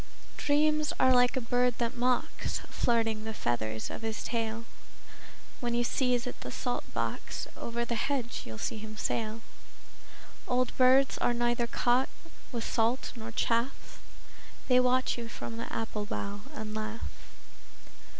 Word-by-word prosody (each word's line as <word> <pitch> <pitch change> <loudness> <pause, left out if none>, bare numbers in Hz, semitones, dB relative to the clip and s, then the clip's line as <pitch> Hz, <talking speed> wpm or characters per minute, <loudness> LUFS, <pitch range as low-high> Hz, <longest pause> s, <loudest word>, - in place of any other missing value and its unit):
Dreams 300 +1 +3
are 260 0 +6
like 245 +1 +5
a - - +4
bird 245 +1 +2
that 235 -1 -1
mocks, 250 0 0
Flirting 225 -2 +1
the 220 0 -4
feathers 110 -2 -1
of - - -6
his 225 0 -3
tail. 230 -1 -2 0.9
When 240 -2 0
you 240 - +3
sieze 245 -1 +1
at 250 - -6
the 125 - -5
salt 245 - -3
box, - - -2
Over 235 0 -2
the 235 - -2
hedge 245 0 -1
you'll 110 -1 -7
see 220 - -2
him 215 0 -8
sail. 220 +1 -1 1.1
Old 250 0 +1
birds 260 +1 +5
are 240 - +2
neither 240 0 +2
caught 245 +2 +2 0.4
with 235 -3 -2
salt 230 +4 +1
nor 225 -1 -6
chaff: 235 +2 0 0.7
They 250 0 +7
watch 255 0 +3
you 235 - -4
from 230 0 -6
the 230 - -5
apple 215 -2 -3
bough 205 0 -3
and 215 -4 -5
laugh. 215 +1 -3
235 Hz, 150 wpm, -31 LUFS, 220-250 Hz, 1.1 s, They